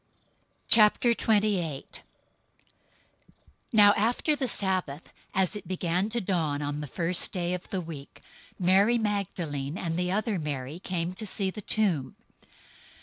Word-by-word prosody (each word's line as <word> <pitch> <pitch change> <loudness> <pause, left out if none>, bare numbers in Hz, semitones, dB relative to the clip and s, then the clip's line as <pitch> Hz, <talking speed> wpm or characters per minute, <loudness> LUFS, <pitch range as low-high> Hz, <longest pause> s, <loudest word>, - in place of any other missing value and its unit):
028:001 210 - +3 1.7
Now 205 -3 +7
after 245 +7 +1
the 270 -3 -1
Sabbath, 185 - -2 0.2
as 190 +2 +1
it 205 - -7
began 185 +2 -1
to 235 +2 -1
dawn 160 -8 -1
on 145 +1 -3
the 150 - -5
first 170 +6 +1
day 175 -2 -2
of 180 0 -6
the 190 - -2
week, 155 -4 -10 0.3
Mary 195 +6 +4
Magdalene 180 -9 -2
and 165 -3 -3
the 180 0 0
other 215 -1 -1
Mary 145 0 -4
came 180 -1 -3
to 215 +4 -6
see 190 -1 0
the 210 - -7
tomb. 180 -12 0
185 Hz, 130 wpm, -27 LUFS, 165-210 Hz, 1.7 s, Now